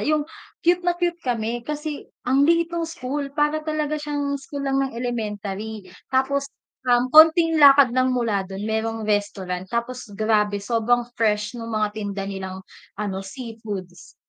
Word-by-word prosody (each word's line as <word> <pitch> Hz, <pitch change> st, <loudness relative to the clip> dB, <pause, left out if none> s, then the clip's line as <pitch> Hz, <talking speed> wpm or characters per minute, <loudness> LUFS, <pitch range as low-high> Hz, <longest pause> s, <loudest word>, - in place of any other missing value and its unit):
yung 305 Hz, -1 st, +2 dB, 0.4 s
cute 350 Hz, +1 st, +4 dB
na 350 Hz, -1 st, 0 dB
cute 350 Hz, -1 st, -1 dB
kami 235 Hz, -2 st, -2 dB
kasi 300 Hz, +3 st, -5 dB, 0.2 s
ang 270 Hz, +3 st, +3 dB
liit 335 Hz, 0 st, +3 dB
no'ng 335 Hz, -1 st, -1 dB
school, 285 Hz, -3 st, -4 dB
para 300 Hz, +1 st, +2 dB
talaga 305 Hz, -1 st, -2 dB
siyang 285 Hz, -1 st, -2 dB
school 280 Hz, 0 st, -6 dB
lang 270 Hz, 0 st, +1 dB
ng 270 Hz, -3 st, -2 dB
elementary. 215 Hz, -3 st, -4 dB, 0.2 s
Tapos 275 Hz, +2 st, +1 dB, 0.4 s
ah, 245 Hz, 0 st, +5 dB
konting 325 Hz, +1 st, +7 dB
lakad 280 Hz, -3 st, +8 dB
lang 255 Hz, +1 st, +2 dB
mula 230 Hz, -5 st, +1 dB
dun 195 Hz, +1 st, -6 dB
merong 220 Hz, +1 st, -2 dB
restaurant, 195 Hz, -3 st, -1 dB
tapos 235 Hz, 0 st, -3 dB
grabe 210 Hz, -1 st, +2 dB
sobrang 235 Hz, +2 st, +2 dB, 0.2 s
fresh 210 Hz, -2 st, +1 dB
nung 230 Hz, -1 st, -5 dB
mga 210 Hz, -1 st, +1 dB
tinda 205 Hz, -2 st, -4 dB
nilang 190 Hz, -1 st, -6 dB, 0.3 s
ano, 200 Hz, -2 st, -3 dB
seafoods. 205 Hz, -5 st, -8 dB
245 Hz, 150 wpm, -23 LUFS, 210-290 Hz, 0.4 s, lakad